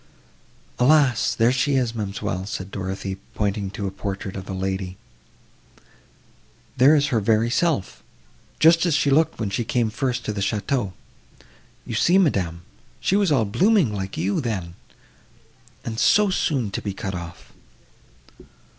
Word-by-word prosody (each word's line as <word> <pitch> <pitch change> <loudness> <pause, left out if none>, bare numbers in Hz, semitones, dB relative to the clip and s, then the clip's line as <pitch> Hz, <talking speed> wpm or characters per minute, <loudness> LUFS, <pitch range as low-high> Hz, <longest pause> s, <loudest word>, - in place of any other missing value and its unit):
"Alas! 135 -2 +3
there 115 +1 +3
she 135 +2 +1
is, 125 -3 +1
ma'amselle," 100 -3 -4
said 95 -2 -5
Dorothée, 95 0 -4 0.2
pointing 100 -1 -1
to 100 +1 -5
a 95 - -2
portrait 95 -1 -5
of 95 0 -7
a - - -3
lady, 95 0 -3 1.8
"there 135 +5 +6
is 145 -1 +2
her 115 - +2
very 110 +2 +2
self! 150 - 0 0.6
just 165 +1 +5
as 160 - +2
she 145 -1 +2
looked 160 +3 +3
when 105 -3 -2
she 120 - -1
came 115 -1 0
first 125 0 -2
to 105 - -2
the 100 - -4
château. 100 +1 -1 0.9
You - - -6
see, 180 +2 +3
madam, 90 - +1 0.4
she 190 - +1
was 200 -5 +2
all 130 -6 +3
blooming 180 - +2
like 95 -1 -5
you, 100 - 0
then—and 110 +2 -9
so 210 -3 +4
soon 135 - 0
to - - -3
be 100 - -4
cut 95 -1 -4
off!" 85 -1 -9
110 Hz, 145 wpm, -23 LUFS, 95-140 Hz, 1.8 s, there